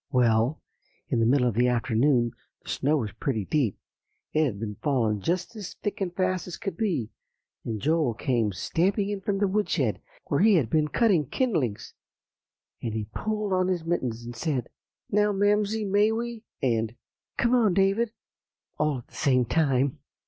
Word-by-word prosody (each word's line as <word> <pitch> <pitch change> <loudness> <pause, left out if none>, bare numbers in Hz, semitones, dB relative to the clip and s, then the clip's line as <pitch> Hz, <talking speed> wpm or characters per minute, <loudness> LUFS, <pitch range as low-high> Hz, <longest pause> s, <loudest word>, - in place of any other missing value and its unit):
"Well, 120 +1 +2 0.5
in 120 - +1
the 115 - +3
middle 125 0 +4
of 120 - +1
the 120 +4 +3
afternoon 120 +1 +2 0.3
the - - -11
snow 150 +3 +1
was 110 -7 -2
pretty 110 0 -2
deep; 130 -8 0 0.6
it 155 0 +3
had 105 -8 -3
been 105 -2 -5
falling 115 -8 +1
just 180 - -1
as 205 -4 -7
thick 205 - -4
and 185 -2 -1
fast 185 -1 0
as 180 - -6
could 195 - -4
be, 175 - -1 0.5
and 110 -2 -3
Joel 150 -3 +1
came 115 -3 0
stamping 185 - 0
in 205 -1 -3
from 195 +1 -1
the 200 0 +2
woodshed, 205 +2 0 0.2
where - - 0
he 215 0 +6
had 135 -10 +1
been 155 -1 +3
cutting 180 - +2
kindlings, 160 - -1 0.9
and 115 -2 -3
he 110 -1 -3
pulled 215 -2 -2
on 185 0 +2
his 175 -3 -1
mittens, 125 -9 -2
and 120 0 -7
said, 125 0 -2 0.4
'Now, 210 +1 +3
Mamsie, 205 +2 +2
may 205 +2 +3
we?' 235 0 -4 0.2
and 115 -2 +1 0.4
'Come 235 +1 +2
on, 220 -7 +4
David' 200 +4 +2 0.7
all 150 -2 +1
at 120 - -11
the - - -26
same 130 -4 +2
time." 135 -1 +1
150 Hz, 175 wpm, -27 LUFS, 120-200 Hz, 0.9 s, he